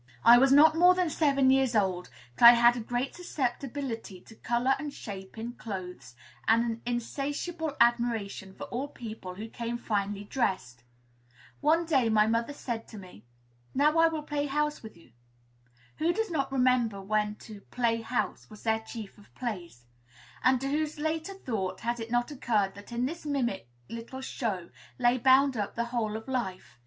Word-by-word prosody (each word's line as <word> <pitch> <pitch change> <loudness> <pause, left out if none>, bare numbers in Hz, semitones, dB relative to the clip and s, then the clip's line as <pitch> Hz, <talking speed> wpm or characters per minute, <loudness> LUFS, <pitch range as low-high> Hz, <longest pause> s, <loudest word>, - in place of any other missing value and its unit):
I 240 +1 +9
was 270 +1 +4
not 305 +3 +7
more 360 +2 +6
than 360 -3 0
seven 275 -4 +3
years 265 -3 +2
old; 185 -4 0 0.2
but 235 - +4
I 235 - +13
had 240 0 +5
a - - -3
great 245 +3 -2
susceptibility 255 - -4
to - - -15
color 240 +4 +1
and 295 0 -4
shape 195 -5 -9
in 235 +2 -5
clothes, 185 - -7 0.3
and 230 +1 +5
an 230 -1 -3
insatiable 285 +6 -3
admiration 235 -5 +1
for - - -8
all 255 +4 -3
people 220 -9 -8
who 215 +4 -6
came 235 +1 -4
finely 205 -3 -2
dressed. 190 - -2 0.8
One 330 +3 +3
day, 270 -8 +2
my 215 -1 +4
mother 230 +4 0
said 235 -5 -5
to 220 - -11
me, 180 - -13 0.5
"Now 300 +4 +3
I 330 - +7
will 320 -2 -3
play 290 -1 -2
'house' 300 +1 -1
with 220 -5 -11
you." 165 -7 -20 0.9
Who 325 +2 +2
does 445 -2 -2
not 275 -4 -1
remember 250 -5 +2
when 210 +1 -1
to 210 -2 -10
"play 230 -2 0
house" 240 +2 -3
was 215 -2 -13
their 220 -1 +1
chief 220 -2 -9
of 205 - -19
plays? 175 - -6 0.6
And 255 0 +4
to 270 - -2
whose 300 +2 -1
later 315 +5 -2
thought 195 - -4
has 235 +1 -2
it 225 0 -6
not 240 +3 0
occurred 215 -8 0
that 205 +3 -13
in 240 +1 -1
this 330 +6 -5
mimic 245 - -2 0.2
little 230 +3 -7
show 205 -10 -4 0.3
lay 245 0 +3
bound 265 +2 +5
up 205 -3 -3
the 235 - -1
whole 220 -3 -1
of 220 - -11
life? 185 - -4
240 Hz, 180 wpm, -29 LUFS, 215-275 Hz, 0.9 s, I